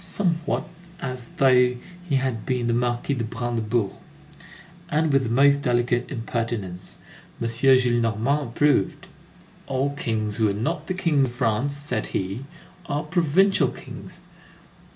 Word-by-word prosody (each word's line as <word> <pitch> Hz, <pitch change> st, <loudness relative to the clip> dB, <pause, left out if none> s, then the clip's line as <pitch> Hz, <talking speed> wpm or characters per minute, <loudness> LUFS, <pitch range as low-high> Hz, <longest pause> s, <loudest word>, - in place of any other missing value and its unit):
somewhat 170 Hz, -2 st, 0 dB, 0.3 s
as 130 Hz, -4 st, -5 dB
though 125 Hz, -2 st, +5 dB, 0.3 s
he 140 Hz, -, +2 dB
had 130 Hz, -5 st, -1 dB
been 125 Hz, -2 st, -1 dB
the 120 Hz, -, +1 dB
Marquis 120 Hz, +3 st, 0 dB
de 120 Hz, -4 st, -2 dB
Brandebourg, 115 Hz, -2 st, -1 dB, 1.0 s
and 155 Hz, 0 st, +1 dB
with 135 Hz, -, +5 dB
the 120 Hz, -, -2 dB
most 140 Hz, +4 st, +5 dB
delicate 120 Hz, -2 st, +1 dB
impertinence. 115 Hz, -7 st, -4 dB, 0.4 s
M. 115 Hz, -, -1 dB
Gillenormand 120 Hz, +1 st, +2 dB
approved: 130 Hz, -3 st, +1 dB, 0.6 s
"All 135 Hz, +1 st, 0 dB
kings 110 Hz, -6 st, -1 dB
who 110 Hz, -2 st, +3 dB
are -, -, 0 dB
not 150 Hz, +10 st, -2 dB
the 185 Hz, -, -2 dB
King 160 Hz, -7 st, +2 dB
of 125 Hz, -, -4 dB
France," 125 Hz, +3 st, 0 dB
said 145 Hz, -6 st, -2 dB
he, 95 Hz, +8 st, -3 dB, 0.4 s
"are 145 Hz, -3 st, -1 dB
provincial 175 Hz, +4 st, +3 dB
kings." -, -, -10 dB
125 Hz, 130 wpm, -24 LUFS, 115-145 Hz, 1.0 s, though